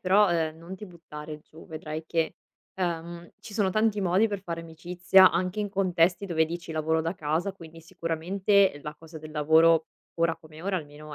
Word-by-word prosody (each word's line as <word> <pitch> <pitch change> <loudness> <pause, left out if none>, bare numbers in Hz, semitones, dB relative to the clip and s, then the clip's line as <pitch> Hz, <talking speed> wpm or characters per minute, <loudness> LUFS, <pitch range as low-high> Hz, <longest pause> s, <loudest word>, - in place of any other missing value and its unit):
però, 190 +1 +4
ehm, 160 -2 0
non 170 +3 -9
ti 210 +2 -9
buttare 155 -3 -9
giù, 160 +2 -16
vedrai 155 0 -6
che, 165 -1 -1 0.4
ehm, 170 -1 -4
ci 210 - -11
sono 205 -3 +1
tanti 215 +1 +1
modi 190 +4 +3
per 200 -2 -4
fare 170 -3 -5
amicizia 180 +3 +4
anche 185 +5 -1
in 205 - -1
contesti 185 -1 +2
dove 160 -4 +1
dici: 170 0 -6
"Lavoro 160 +1 0
da 165 +3 -2
casa," 165 +4 -1
quindi 165 -3 -13
sicuramente 180 +2 +1
la 150 - -6
cosa 160 +1 -12
del 155 0 -10
lavoro, 160 +2 +4 0.3
ora 165 -1 +1
come 155 +1 -14
ora 195 0 -1
almeno, 150 0 -10
165 Hz, 185 wpm, -27 LUFS, 160-185 Hz, 0.4 s, però